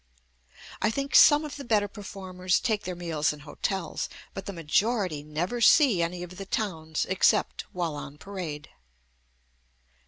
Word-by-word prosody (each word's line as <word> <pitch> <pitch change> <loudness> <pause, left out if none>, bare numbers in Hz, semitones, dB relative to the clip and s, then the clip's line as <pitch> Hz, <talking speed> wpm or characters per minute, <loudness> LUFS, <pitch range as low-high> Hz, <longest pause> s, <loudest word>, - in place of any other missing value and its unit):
I - - +3
think 275 +5 -3
some 295 +1 +7
of 295 - -7
the 280 - -7
better 215 -4 +2
performers 185 -2 -2
take 215 -3 -1
their 180 0 -3
meals 165 -4 0
in 150 -1 -10
hotels, 165 +4 -3 0.2
but 195 - -7
the - - -3
majority 180 0 0
never 165 +11 -3
see 235 - +6
any 175 +1 -2
of 180 +1 -10
the 195 - -6
towns 160 -9 -2
except 190 0 +2
while 175 -3 -2
on 145 0 -8
parade. 165 -5 -7
185 Hz, 150 wpm, -27 LUFS, 160-210 Hz, 0.2 s, some